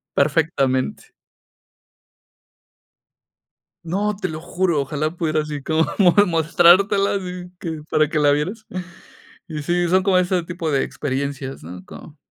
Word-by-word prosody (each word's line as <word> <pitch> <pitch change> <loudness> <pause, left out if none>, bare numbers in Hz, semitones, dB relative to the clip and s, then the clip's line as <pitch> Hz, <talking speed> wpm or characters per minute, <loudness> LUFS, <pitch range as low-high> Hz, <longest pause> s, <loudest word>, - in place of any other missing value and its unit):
perfectamente. 140 -3 0 2.7
No, 205 +5 -1
te 190 -2 -3
lo 155 0 -6
juro, 175 -2 0
ojalá 150 +3 -2
pudiera 155 -3 0
así 150 -2 -6
como 160 +3 +1
mo 180 -4 +5
mostrártela 175 +4 +4
así 180 -2 -6
que 160 -3 -5
para 155 -1 +3
que 155 - -1
la 145 -1 +4
vieras. 185 +10 -2 0.8
Y 155 -4 -5
sí, 175 +3 0
son 185 +1 +4
como 190 -1 +2
ese 180 0 +1
tipo 170 -2 -4
de 135 - +2
experiencias, 135 0 -4
¿no? 90 +3 -10
Como. 150 +9 -12
160 Hz, 130 wpm, -21 LUFS, 145-180 Hz, 2.7 s, mo